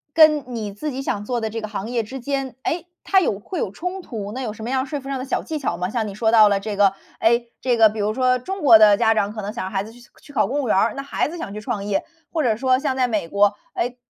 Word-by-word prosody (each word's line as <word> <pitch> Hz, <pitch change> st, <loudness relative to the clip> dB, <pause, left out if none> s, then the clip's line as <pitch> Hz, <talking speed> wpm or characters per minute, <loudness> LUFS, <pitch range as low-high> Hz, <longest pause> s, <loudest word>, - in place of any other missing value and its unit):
跟 310 Hz, -3 st, +6 dB
你 215 Hz, -2 st, -4 dB
自 300 Hz, +9 st, -4 dB
己 270 Hz, +1 st, -5 dB
想 205 Hz, -5 st, -2 dB
做 245 Hz, +2 st, -2 dB
的 220 Hz, -1 st, -3 dB
这 225 Hz, +1 st, -4 dB
个 215 Hz, -, -4 dB
行 210 Hz, 0 st, -5 dB
业 240 Hz, -2 st, +1 dB
之 260 Hz, +5 st, -7 dB
间， 270 Hz, -1 st, -3 dB
诶， 350 Hz, +2 st, -2 dB, 0.2 s
它 385 Hz, -1 st, +4 dB
有 210 Hz, -, 0 dB
会 355 Hz, -, -5 dB
有 -, -, -1 dB
冲 360 Hz, -, -5 dB
突， 210 Hz, -, -6 dB
那 260 Hz, -, -5 dB
有 225 Hz, -5 st, -3 dB
什 220 Hz, -, -10 dB
么 240 Hz, -, -3 dB
样 265 Hz, +1 st, 0 dB
说 290 Hz, 0 st, -3 dB
服 270 Hz, -, -11 dB
上 275 Hz, -1 st, -3 dB
的 255 Hz, -, -4 dB
小 270 Hz, -, -1 dB
技 315 Hz, -1 st, -4 dB
巧 210 Hz, -11 st, -2 dB
吗？ 180 Hz, +1 st, -1 dB
像 225 Hz, -2 st, -1 dB
你 200 Hz, -, -7 dB
说 220 Hz, +1 st, +1 dB
到 215 Hz, -2 st, +7 dB
了 200 Hz, -, +2 dB
这 205 Hz, +1 st, -4 dB
个， 200 Hz, -1 st, +4 dB, 0.3 s
诶， 235 Hz, +1 st, +2 dB
这 245 Hz, -2 st, +1 dB
个 220 Hz, -1 st, +7 dB
比 215 Hz, 0 st, -7 dB
如 210 Hz, +1 st, +1 dB
说 255 Hz, -1 st, +2 dB
中 385 Hz, +9 st, -5 dB
国 235 Hz, -6 st, +8 dB
的 210 Hz, -2 st, +7 dB
家 225 Hz, 0 st, +4 dB
长， 210 Hz, -1 st, 0 dB
可 215 Hz, -2 st, -6 dB
能 205 Hz, -, -4 dB
想 225 Hz, -, -4 dB
让 190 Hz, -, -6 dB
孩 195 Hz, -1 st, -1 dB
子 220 Hz, -, -11 dB
去 245 Hz, +1 st, -16 dB, 0.2 s
去 290 Hz, -, -16 dB
考 215 Hz, -7 st, +2 dB
公 285 Hz, +5 st, -1 dB
务 255 Hz, -, -3 dB
员 -, -, +2 dB
儿， 210 Hz, +3 st, +3 dB
那 275 Hz, -, -5 dB
孩 275 Hz, -, -1 dB
子 345 Hz, -, -7 dB
想 205 Hz, -11 st, -6 dB
去 210 Hz, -, -6 dB
创 215 Hz, -4 st, -3 dB
业。 205 Hz, -1 st, 0 dB, 0.3 s
或 315 Hz, -3 st, 0 dB
者 225 Hz, -3 st, +2 dB
说 255 Hz, +2 st, +2 dB
像 270 Hz, -1 st, -1 dB
在 255 Hz, -1 st, +2 dB
美 210 Hz, -7 st, -1 dB
国， 200 Hz, +3 st, +3 dB, 0.2 s
哎， 245 Hz, +1 st, -2 dB
230 Hz, 335 characters per minute, -22 LUFS, 210-265 Hz, 0.3 s, 国